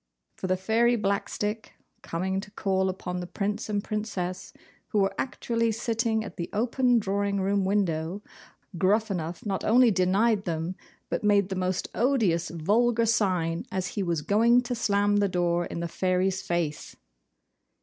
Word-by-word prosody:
For - - -4
the 185 0 +1
Fairy 225 +5 +2
Blackstick 210 +1 -2 0.3
coming 190 +3 -2
to 200 - -8
call 190 -2 0
upon 180 -1 -4
the 175 - -5
Prince 205 +4 -3
and 205 -1 -1
Princess, 200 -4 -4 0.4
who 215 - -2
were 195 -1 +2
actually 230 -3 -1
sitting 225 0 0
at 205 - -9
the 170 - -4
open 245 +3 +2
drawing 200 -1 0
room 195 0 +1
window, 190 -1 -1 0.6
Gruffanuff 190 -4 0
not 195 -2 -2
only 240 +1 +5
denied 200 +3 +2
them, 165 +1 -2 0.3
but - - -2
made 200 -2 +3
the 190 - -2
most 185 0 -1
ODIOUS 220 -10 +1
VULGAR 225 +8 +2
SIGN 185 -7 +1
as 185 -1 -2
he 205 - -3
was 170 -5 -1
going 230 +6 +4
to 245 0 -4
slam 205 -3 +2
the 200 -1 +2
door 175 -1 0
in 170 - -5
the 170 - -2
Fairy's 185 +2 0
face! 170 -4 -3
200 Hz, 155 wpm, -27 LUFS, 180-220 Hz, 0.6 s, only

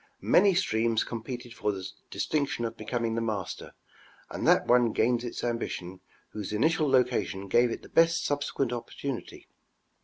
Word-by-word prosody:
Many 200 -3 +5
streams 115 - +1
competed 120 +1 -6
for 105 -2 -1
the 95 -2 -5 0.2
distinction 140 -5 -1
of 115 0 -4
becoming 115 +1 -2
the 115 - -1
master, 105 -5 -4 0.6
and - - -2
that - - +5
one 120 -2 +4
gained 120 +1 +2
its 120 - -5
ambition 95 -6 -3 0.3
whose 105 -3 -6
initial 155 +7 +2
location 125 -7 +1
gave 120 +5 +4
it - - -5
the - - -11
best 165 0 +3
subsequent 145 -3 -1
opportunity. 125 +2 -6
120 Hz, 150 wpm, -28 LUFS, 110-135 Hz, 0.6 s, Many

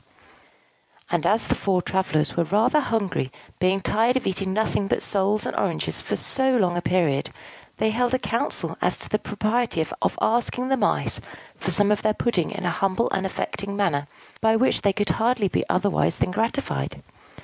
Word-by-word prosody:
And - - +1
as 215 +3 +3
the - - +1
four 185 -3 0
travellers 155 -5 0
were 170 - +2
rather 215 - +3
hungry, 205 - -1 0.3
being 185 +1 +2
tired 230 +6 +2
of 260 - -3
eating 190 0 -1
nothing 210 -1 0
but - - 0
soles 205 +2 +1
and - - -3
oranges - - -1
for - - -2
so 265 -1 +2
long 180 -5 +2
a 175 - -1
period, 165 -5 +1 0.5
they 220 - +1
held 245 +2 +1
a - - +3
council 230 -2 -2
as - - +1
to - - -5
the 215 - +1
propriety 215 -1 -1
of 160 - -2
asking 240 +2 +1
the 270 - +3
Mice 260 - 0 0.3
for - - -4
some 205 -1 +3
of 210 - +1
their 215 0 +1
pudding 190 -9 0
in - - -5
a 175 - +1
humble 195 +6 0
and 195 0 0
affecting 200 +1 -4
manner, 155 -8 0 0.3
by 220 0 +4
which 250 +4 +2
they 200 - +3
could 205 +1 -1
hardly 230 -2 +2
be - - 0
otherwise 195 +1 +1
than - - 0
gratified. 230 +8 -2
205 Hz, 185 wpm, -24 LUFS, 185-230 Hz, 0.5 s, by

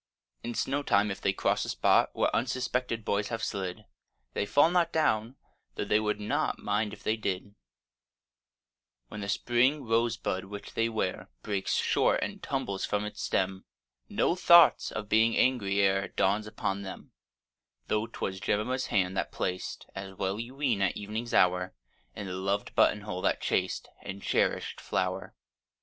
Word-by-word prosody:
In 120 - -4
snowtime 115 -7 +1
if 95 - -6
they 100 - +2
cross 95 - 0
a - - -5
spot - - +3
Where - - +1
unsuspected 125 -2 -1
boys 100 0 0
have 115 -2 -4
slid, 95 -3 -3 0.5
They 100 - -1
fall 145 +7 +5
not 175 -2 +2
down—though 125 -5 -2
they 105 - +3
would 105 -1 -1
not 105 - -1
Mind 105 0 -1
if - - -11
they 110 - +1
did: 100 -2 -3 1.6
When 105 - -7
the 100 - -4
spring 125 +7 +2
rosebud 115 -5 0
which 100 +1 -9
they 115 0 +1
wear 110 -5 -2
Breaks 100 -2 -1
short - - +2
and - - -5
tumbles 100 -1 -3
from 105 0 -1
its 105 - -6
stem, 95 0 -1 0.4
No 170 - +1
thought 170 -2 +6
of 105 0 -5
being 110 +2 +3
angry 100 -7 +2
e'er 95 0 +2
Dawns 105 +3 +1
upon 100 -2 -2
them; 95 -2 -8 0.8
Though 110 +1 0
'twas 95 -4 -4
Jemima's 125 +7 -1
hand 95 -2 +1
that - - -1
placed, 90 0 -3
(As 95 0 -7
well 95 +2 -2
you 120 +3 -6
ween) 130 -8 0
at 95 - +1
evening's 110 +3 -4
hour, 90 0 +3 0.4
In 100 - -5
the 95 - -5
loved 100 +2 -2
button 105 - +3
hole 105 -3 -5
that - - +1
chaste - - -1
And 95 +1 -7
cherish'd - - 0
flower. - - -2
105 Hz, 160 wpm, -29 LUFS, 95-115 Hz, 1.6 s, thought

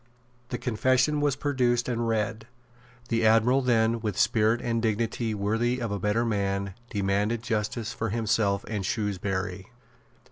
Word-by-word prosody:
The 125 - -2
confession 130 +4 +1
was 145 -2 +2
produced 125 -4 +1
and 120 -2 -1
read. 110 0 -1 0.6
The 115 -1 +1
Admiral 115 +4 +4
then, 115 -2 +2
with 105 -4 -3
spirit 110 +1 +3
and 115 -1 -1
dignity 110 0 -1
worthy 115 +5 0
of 115 -4 -3
a 100 - -2
better 105 +5 +1
man, 100 -3 -1 0.2
demanded 105 +2 0
justice 115 0 -2
for 115 -2 -3
himself 110 -2 0
and 105 -3 -3
Shrewsbury. 95 -2 -2
115 Hz, 140 wpm, -27 LUFS, 105-120 Hz, 0.6 s, Admiral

